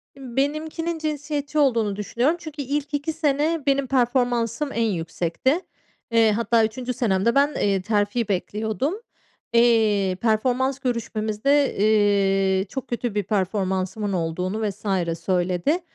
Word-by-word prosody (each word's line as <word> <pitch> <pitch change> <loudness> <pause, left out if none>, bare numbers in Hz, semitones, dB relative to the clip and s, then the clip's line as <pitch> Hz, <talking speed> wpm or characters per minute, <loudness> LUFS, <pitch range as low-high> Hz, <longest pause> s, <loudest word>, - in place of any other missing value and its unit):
Imm, 260 -3 -10
benimkinin 315 +4 -1
cinsiyetçi 300 -1 -2
olduğunu 230 -8 +2
düşünüyorum 245 - 0
çünkü 310 -3 -7
ilk 290 +2 -3
2 290 +2 -1
sene 305 0 0
benim 275 -1 +2
performansım 245 +1 +1
en 230 - -1
yüksekti. 175 - -1 0.5
Eee, 225 -1 +4
hatta 225 +1 +2
3'üncü 250 +3 -4
senemde 225 0 +1
ben, 285 +2 +3
eee, 195 -2 +1
terfi 210 +2 0
bekliyordum. 220 - -1 0.6
Eee, 215 -5 +3
performans 250 +4 +1
görüşmemizde, 235 +2 0
eee, 195 -2 +3
çok 265 0 -5
kötü 240 -3 -3
bir 205 - +1
performansımın 190 0 -1
olduğunu 185 +5 -1
vs. 200 - -11 0.3
söyledi 180 - 0
230 Hz, 120 wpm, -23 LUFS, 205-275 Hz, 0.6 s, Eee